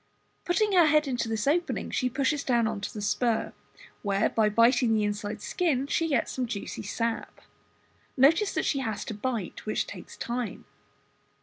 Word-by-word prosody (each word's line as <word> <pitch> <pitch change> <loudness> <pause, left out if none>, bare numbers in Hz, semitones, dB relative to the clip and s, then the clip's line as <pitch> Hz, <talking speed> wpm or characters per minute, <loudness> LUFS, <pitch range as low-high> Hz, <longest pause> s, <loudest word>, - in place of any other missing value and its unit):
Putting 415 +4 +2
her 350 -4 +6
head 300 0 +3
into 240 -3 -1
this 220 -1 -1
opening 335 +5 0
she 255 - 0
pushes 275 +3 0
down 235 -3 +2
into 215 -2 -3
the 210 - -6
spur, 230 +2 0 0.5
where 200 -1 +1
by 220 -2 +2
biting 230 +1 +4
the 215 - +2
inside 205 +1 -3
skin 300 -8 0
she 325 +3 0
gets 275 -7 0
some 255 -2 -2
juicy 210 -3 -5
sap. 230 +3 -3 0.8
Notice 325 +10 +5
that - - 0
she 275 - +1
has 220 -5 -3
to - - -4
bite, 215 -2 -4
which 215 - 0
takes - - -10
time. 240 -1 -4
240 Hz, 170 wpm, -28 LUFS, 215-280 Hz, 0.8 s, her